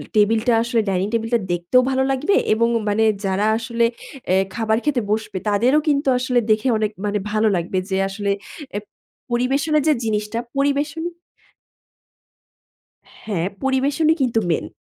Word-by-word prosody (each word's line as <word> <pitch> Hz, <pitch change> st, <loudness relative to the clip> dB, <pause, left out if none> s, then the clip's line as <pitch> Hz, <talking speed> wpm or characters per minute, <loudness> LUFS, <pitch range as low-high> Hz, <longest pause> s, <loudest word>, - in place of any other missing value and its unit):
টেবিলটা 220 Hz, +3 st, +3 dB
আসলে 235 Hz, -1 st, +1 dB
ডাইনিং 190 Hz, 0 st, 0 dB
টেবিলটা 230 Hz, +1 st, +1 dB
দেখতেও 175 Hz, +9 st, +3 dB
ভালো 265 Hz, 0 st, +1 dB
লাগবে 290 Hz, +9 st, +1 dB, 0.2 s
এবং 230 Hz, +1 st, +2 dB, 0.2 s
মানে 215 Hz, +2 st, +2 dB, 0.2 s
যারা 195 Hz, +2 st, 0 dB
আসলে 235 Hz, +1 st, 0 dB, 0.4 s
অ্যা 185 Hz, -, +2 dB, 0.2 s
খাবার 220 Hz, -1 st, +1 dB
খেতে 280 Hz, -5 st, +1 dB
বসবে 215 Hz, -2 st, -2 dB
তাদেরও 240 Hz, +8 st, +3 dB
কিন্তু 285 Hz, -1 st, +1 dB
আসলে 250 Hz, -1 st, +1 dB
দেখে 215 Hz, +4 st, +2 dB
অনেক 215 Hz, -1 st, -1 dB
মানে 205 Hz, 0 st, 0 dB
ভালো 215 Hz, +1 st, +2 dB
লাগবে। 175 Hz, +2 st, -2 dB
যে 190 Hz, -, 0 dB
আসলে 200 Hz, 0 st, -2 dB, 0.4 s
অ্যা 205 Hz, -, -3 dB, 0.5 s
পরিবেশনের 275 Hz, +5 st, +1 dB
যে 310 Hz, -, +5 dB
জিনিসটা 210 Hz, +1 st, -1 dB, 0.2 s
পরিবেশন 285 Hz, +3 st, 0 dB, 2.2 s
হ্যাঁ, 185 Hz, -5 st, -1 dB, 0.2 s
পরিবেশনই 280 Hz, +4 st, +2 dB
কিন্তু 240 Hz, -4 st, +2 dB
মেইন। 160 Hz, -, -1 dB
230 Hz, 140 wpm, -21 LUFS, 210-265 Hz, 2.2 s, যে